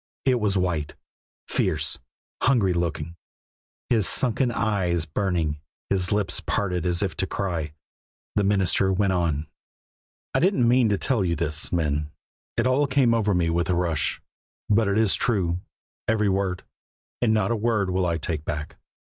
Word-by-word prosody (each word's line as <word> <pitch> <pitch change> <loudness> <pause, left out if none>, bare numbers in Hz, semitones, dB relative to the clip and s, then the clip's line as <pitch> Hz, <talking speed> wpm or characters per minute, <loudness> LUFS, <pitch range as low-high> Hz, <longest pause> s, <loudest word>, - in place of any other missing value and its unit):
It 130 -2 +3
was 105 -3 +1
white, 85 -5 -1 0.5
fierce, - - 0 0.4
hungry 115 -9 +3
looking, 85 -1 -3 0.7
his 110 -5 +2
sunken 125 0 +1
eyes 95 -8 0
burning, 80 -2 -1 0.3
his 95 -2 +1
lips 105 -2 +1
parted 90 -3 -1
as 90 +2 +1
if 95 - -2
to 95 - 0
cry. 85 -7 -3 0.6
The 105 - +2
minister 95 -1 +3
went 95 0 +1
on. 80 -4 0 0.9
"I - - +3
didn't 165 -10 +3
mean 120 -1 +4
to 100 - +2
tell 115 -3 0
you 85 -2 0
this, 75 +1 0
men; 75 -3 0 0.5
it 115 - +2
all 130 +3 +3
came 130 -3 +3
over 105 -4 +1
me 85 -2 +1
with 85 +2 0
a 90 - +2
rush; 85 -4 0 0.5
but 110 0 +3
it 100 +1 +1
is 110 -3 +3
true, 90 -7 0 0.5
every 105 -2 +2
word, 95 -2 -1 0.6
and 120 -3 +3
not 110 +1 +2
a - - +2
word 105 -4 0
will 90 0 +1
I 85 -1 0
take 80 -1 -3
back. 75 0 -5
95 Hz, 160 wpm, -25 LUFS, 85-110 Hz, 0.9 s, mean